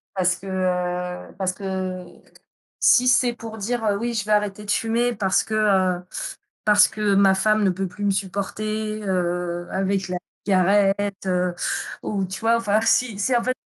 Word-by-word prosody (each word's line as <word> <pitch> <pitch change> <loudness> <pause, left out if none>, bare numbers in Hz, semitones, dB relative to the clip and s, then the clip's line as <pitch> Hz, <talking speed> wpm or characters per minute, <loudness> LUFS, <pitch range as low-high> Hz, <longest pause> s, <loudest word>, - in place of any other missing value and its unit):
parce 180 -1 +2
que, 195 +1 -12
heu 180 -1 -2
parce 185 -1 -1
que, 200 - -12
heu, 185 -2 -5 0.6
si 250 - +5
c'est 250 -1 +4
pour 225 -1 -9
dire: 230 +3 -2
«Heu, 200 -1 +2
oui 235 +2 -2
je 210 -3 -2
veux 215 - -3
arrêter 210 0 0
de 200 - -2
fumer 235 +3 +1
parce 195 -3 +1
que, 220 - -6
heu, 190 -4 +2 0.6
parce 210 -1 +6
que 210 -2 0
ma 195 -1 +5
femme 215 +2 +2
ne 195 - +4
peut 190 +1 -3
plus 195 +4 -8
me 200 - +3
supporter, 215 +3 -3
heu, 175 -2 -2
avec 190 0 -1
la 180 - -2 0.3
cigarette, 200 +1 +2
heu», 180 -1 0 0.5
ou 195 -2 -1
tu 190 +1 -7
vois? 230 +1 +3
Enfin 215 -2 +1
si 225 -2 +1
c'est 245 +4 +2
en 235 - -1
fait 255 +1 0
200 Hz, 185 wpm, -23 LUFS, 185-215 Hz, 0.6 s, parce